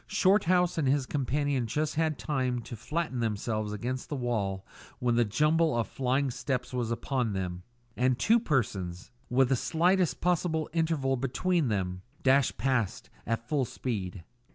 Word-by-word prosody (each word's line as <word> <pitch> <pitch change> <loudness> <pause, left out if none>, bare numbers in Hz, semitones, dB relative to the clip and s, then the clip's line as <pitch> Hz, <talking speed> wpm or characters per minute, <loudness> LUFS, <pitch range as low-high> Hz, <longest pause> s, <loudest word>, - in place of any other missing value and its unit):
Shorthouse 185 -4 +3
and 145 - +1
his 135 0 +2
companion 140 -2 0
just 150 +6 -1
had 160 -2 0
time 130 -5 -1
to 120 - -7
flatten 150 +3 -3
themselves 110 -1 -1
against 125 +5 -4
the 145 - -2
wall 105 -7 -2 0.3
when 125 -1 +1
the 120 0 +4
jumble 150 +7 +2
of 115 - 0
flying 135 +1 0
steps 125 0 -3
was 120 -2 -1
upon 115 -1 -1
them, 90 -2 -3 0.3
and 125 0 +2
two 225 - +4
persons, 100 - -2 0.2
with 125 0 +3
the 135 - +4
slightest 165 +3 +2
possible 165 -2 +1
interval 160 -5 +1
between 145 +5 0
them, 90 -4 -1 0.2
dashed 135 0 +3
past 130 -7 -1 0.2
at 115 +1 -2
full 145 -1 +1
speed. 100 -7 -4
130 Hz, 155 wpm, -29 LUFS, 115-155 Hz, 0.3 s, the